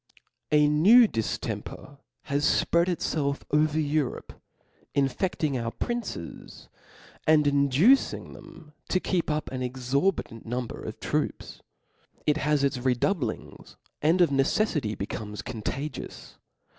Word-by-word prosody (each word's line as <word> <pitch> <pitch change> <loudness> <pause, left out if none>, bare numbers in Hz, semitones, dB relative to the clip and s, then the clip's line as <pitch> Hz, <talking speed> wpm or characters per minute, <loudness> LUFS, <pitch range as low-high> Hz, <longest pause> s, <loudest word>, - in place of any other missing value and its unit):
A 150 -1 +5
New 200 +11 +7
diftempcr 125 - -5 0.2
has 140 +1 -1 0.2
fpread 170 +1 +2
itfclf 150 -5 -1
over 150 +1 +2
Eu 150 -1 +1
^ - - -2
^ - - -4
^ - - -7
rope, - - -11 0.6
infefting 140 +1 0
our 115 - -1
princes, 230 - -6 0.6
and 155 -1 +5
inductng 145 - +3
them 155 -2 -14 0.2
to 185 - +2
keep 180 -3 -1
up 150 -5 -2
an 130 -1 -4
exorbitant 130 - -1
number 120 +1 -4
of - - -7
troops. - - -3 0.6
It 150 0 +2
(has 150 -2 +1
its 135 -2 +1
redoubliogs, 130 +6 -2 0.3
and 165 +5 +3
of 170 -5 +4
necelTity 135 - +1
becomes 105 +1 -5
contagious. 125 +5 -6
145 Hz, 125 wpm, -27 LUFS, 130-160 Hz, 0.6 s, New